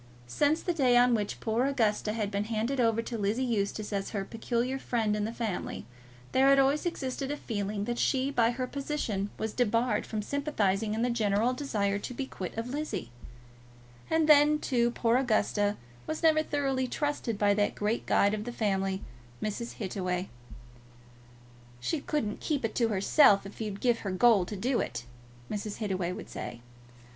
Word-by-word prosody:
Since 290 - +1
the 350 - 0
day 255 -6 +4
on 245 0 +5
which 210 -3 -1
poor 230 +4 +1
Augusta 220 -5 +1
had 210 -2 -2
been 200 0 -1
handed 230 +4 -1
over 230 -1 +2
to 230 -1 -5
Lizzie 210 +6 0
Eustace 215 -3 -1
as 195 -1 -2
her 200 -3 -3
peculiar 240 +4 -2
friend 225 -5 0
in 210 0 -1
the 220 - -3
family, 225 - -4 0.5
there 265 +1 +4
had 275 0 +6
always 275 +5 +3
existed 270 -4 -3
a 290 - -2
feeling 205 -5 -3
that 240 +1 -2
she, 265 0 +1
by 230 -4 +3
her 250 +1 -2
position, 255 -8 -3
was 220 -1 -3
debarred 240 0 +1
from 215 -2 -3
sympathising 215 -7 0
in 225 - 0
the 245 - +1
general 220 +1 +1
desire 205 -7 -1
to 250 - -6
be 270 - -3
quit 190 -5 -7
of 230 +2 -3
Lizzie; 290 - -4 1.0
and 320 -1 +2
then, 300 0 +6
too, 240 -5 +1
poor 235 0 +2
Augusta 215 -4 +1 0.3
was 315 +2 -4
never 315 -1 +5
thoroughly 270 -4 -1
trusted 290 -5 -2
by 205 0 +3
that 205 0 +1
great 210 +3 -1
guide 200 +1 +3
of 215 0 -3
the 240 - -4
family, 195 -4 -1 0.4
Mrs. 225 +3 -4
Hittaway. 185 -2 -3 1.5
"She 305 - -1
couldn't 250 -10 -2
keep 285 -6 -1
it 220 - -2
to 235 - +2
herself 200 +1 +5
if 200 +3 -9
you'd 205 -2 -4
give 240 -2 +2
her 200 - -4
gold 195 -1 +4
to 210 - -5
do 240 +5 0
it," 120 - -3 0.5
Mrs. 210 0 -4
Hittaway 190 -5 -2
would - - -7
say. 120 - -6
230 Hz, 180 wpm, -29 LUFS, 205-260 Hz, 1.5 s, had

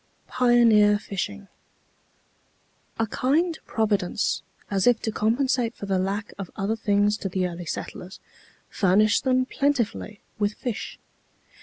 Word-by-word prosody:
PIONEER 230 -4 +5
FISHING. 205 0 -5 1.5
A 225 - +1
kind 315 - 0
Providence, 205 -3 0 0.3
as 195 +1 +1
if 245 -2 +5
to 220 - -1
compensate 235 +2 0
for - - -7
the 195 -1 0
lack 200 +3 -3
of 195 - -5
other 200 +3 -1
things 205 -1 +1
to 195 - -4
the 185 0 0
early 175 0 -7
settlers, 180 +3 -6 0.5
furnished 205 +4 +2
them 255 0 +3
plentifully 255 -7 -1 0.2
with 205 0 0
fish. 245 -3 -5
210 Hz, 125 wpm, -25 LUFS, 200-240 Hz, 1.5 s, PIONEER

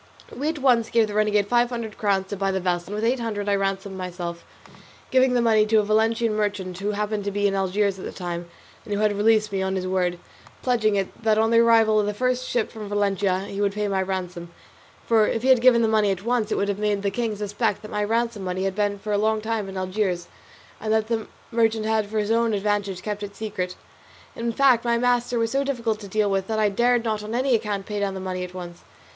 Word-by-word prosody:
We 290 +4 -1
at 320 - -3
once 245 -5 +3
gave 230 -1 +3
the 210 - -6
renegade 210 -1 +2
five 240 +3 +2
hundred 235 -3 -5
crowns 195 -2 +1
to 205 - -3
buy 195 0 -1
the 190 0 0
vessel, 175 -1 -1
and 205 - -5
with 215 - -3
eight 245 +3 +2
hundred 210 -3 -3
I 205 - +2
ransomed 195 0 -1
myself, 175 -2 -5 0.7
giving 260 -1 +4
the 240 - +3
money 220 -2 +4
to 220 - +1
a 210 - +4
Valencian 225 +2 +2
merchant 200 -4 -2
who 205 +1 -1
happened 210 0 -2
to - - 0
be 205 0 -1
in 200 - +2
Algiers 195 0 0
at - - -7
the - - -5
time, 175 -1 -5 0.3
and 205 - -3
who - - -2
had 215 0 +3
me 205 - -4
released 215 0 +3
on 190 0 -1
his 185 -1 -2
word, 180 -1 0 0.5
pledging 225 -5 +2
it 195 +2 -3
that 220 -1 +2
on 225 +1 +2
the 230 - +5
arrival 225 -2 +5
of 205 - +1
the 210 - -2
first 255 +2 -1
ship 240 -3 0
from 215 -2 -8
Valencia 200 -2 +1
he 200 +1 -5
would 200 -1 +1
pay 210 0 -1
my 195 -1 0
ransom; 180 -2 -4 0.6
for 220 -2 +4
if 225 - -2
he 265 - +2
had 255 -3 +6
given 240 -2 +5
the - - +3
money 215 -2 +3
at 190 -1 -2
once 235 -2 0
it - - +2
would 200 - 0
have 200 0 -2
made 205 -1 0
the 200 - 0
king 225 0 -2
suspect 205 0 -2
that 215 - -9
my 210 0 -1
ransom 230 -1 -1
money 185 0 -2
had 195 -1 0
been 205 0 0
for 210 +1 -4
a 205 - +2
long 220 +1 +2
time 220 -2 -3
in 190 - -7
Algiers, 185 -2 -1 0.5
and 215 0 -3
that 220 0 +1
the 225 -2 -1 0.2
merchant 225 -1 +1
had 220 -1 +1
for 215 +1 -4
his 210 0 0
own 230 -1 +2
advantage 200 -2 -1
kept 210 -1 -4
it 200 -1 -7
secret. 195 -4 -4 0.6
In 235 0 -2
fact 255 -1 +4
my 235 -1 +2
master 245 0 +1
was 230 -1 0
so 275 +1 +1
difficult 235 -6 -1
to 205 - -9
deal 210 +2 +1
with 195 -1 0
that 220 - -1
I 215 -1 +3
dared 240 +3 +2
not 215 -2 -1
on 215 +2 -5
any 260 +1 +1
account 210 -3 -1
pay 210 -1 -4
down 200 -1 -1
the - - -4
money 185 -1 -4
at 180 0 -8
once. 175 -1 -8
210 Hz, 255 wpm, -24 LUFS, 195-225 Hz, 0.7 s, had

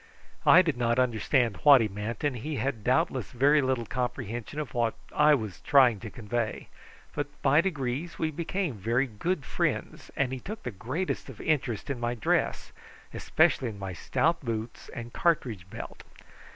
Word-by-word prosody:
I 185 - +8
did 155 -7 -1
not 120 0 +1
understand 120 -2 +1
what 145 +2 +7
he 115 - +1
meant, 105 +4 -5
and 145 -4 0
he 150 +6 -4
had 120 -2 -2
doubtless 130 - +1
very 145 +4 +4
little 130 -3 0
comprehension 120 +2 -4
of 145 -7 -5
what 120 -2 0 0.2
I 150 0 +6 0.3
tried 125 -7 +5
to 115 - -6
convey; 115 +1 -3 0.4
but 145 0 -2 0.2
by 145 +3 +5
degrees 150 -2 -3
we 160 -1 -1
became 170 +1 -2
very 115 +6 0
good 140 - -3
friends, - - -2
and 130 -2 +1
he 130 - -4
took 210 - -7
the 125 - -4
greatest 130 - -3
of - - -11
interest 140 -6 -1
in 130 - -4
my 120 0 -1
dress, 110 - 0 0.4
especially 125 - +2
in 105 - -8
my 95 -2 -5
stout 165 - 0
boots 115 -1 -5
and 120 -1 -8
cartridge 120 - 0
belt. - - -8
125 Hz, 165 wpm, -28 LUFS, 115-150 Hz, 0.4 s, I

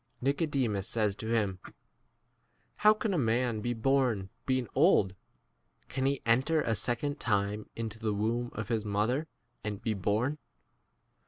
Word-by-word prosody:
Nicodemus 135 - 0
says 105 -3 +1
to 110 - -6
him, 100 -5 +1 1.2
How 210 0 +6
can 215 -1 0
a 175 - +1
man 115 -2 +1
be 120 +2 -1
born 115 -5 +1 0.2
being 130 -2 +1
old? 135 - +4 0.8
can 130 0 0
he 140 -1 -1
enter 130 +8 +3
a 115 - 0
second 125 +7 -1
time 105 -1 0
into 110 -1 -5
the 110 -1 -1
womb 115 +4 0
of 110 -1 -4
his 115 -3 0
mother 110 +9 0 0.4
and 105 -1 -2
„ - - -10
5 - - -20
be 110 - +1
born 110 +9 0
115 Hz, 155 wpm, -31 LUFS, 105-135 Hz, 1.2 s, How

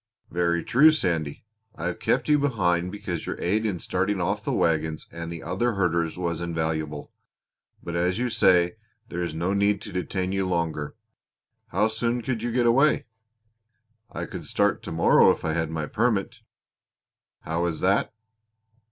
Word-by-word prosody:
"Very 85 -1 +1
true, 145 +6 +6
Sandy. 85 - -1 0.3
I - - -6
have - - -2
kept - - +1
you 150 -1 +4
behind 90 -10 +1
because 100 -5 -5
your - - -4
aid 110 +5 +1
in 95 -4 -1
starting 95 +3 -1
off 85 - -1
the - - -2
wagons 80 -1 0
and 85 0 -6
the 85 -1 -7
other 120 0 0
herders 85 -4 0
was 85 -2 -2
invaluable. 80 -3 -3 0.7
But, 85 - -5
as 90 +2 +1
you 125 0 -1
say, 90 -3 +4 0.3
there 90 - -4
is 85 -3 -3
no 85 +4 0
need 100 0 +2
to - - -8
detain 90 +1 -2
you 95 -1 0
longer. 85 -4 -2 0.7
How 105 +4 +2
soon 115 +2 -1
could 120 -2 -2
you 120 +1 -2
get 120 0 +2
away?" 135 +6 +4 1.1
"I - - -4
could - - -8
start - - +1
to - - -7
morrow 80 +1 +5
if - - 0
I 80 - 0
had 80 -1 -1
my 80 -1 -3
permit." 115 +4 0 1.0
"How 85 +2 -2
is 80 -2 -3
that?" 95 +2 +2
90 Hz, 170 wpm, -25 LUFS, 85-110 Hz, 1.1 s, true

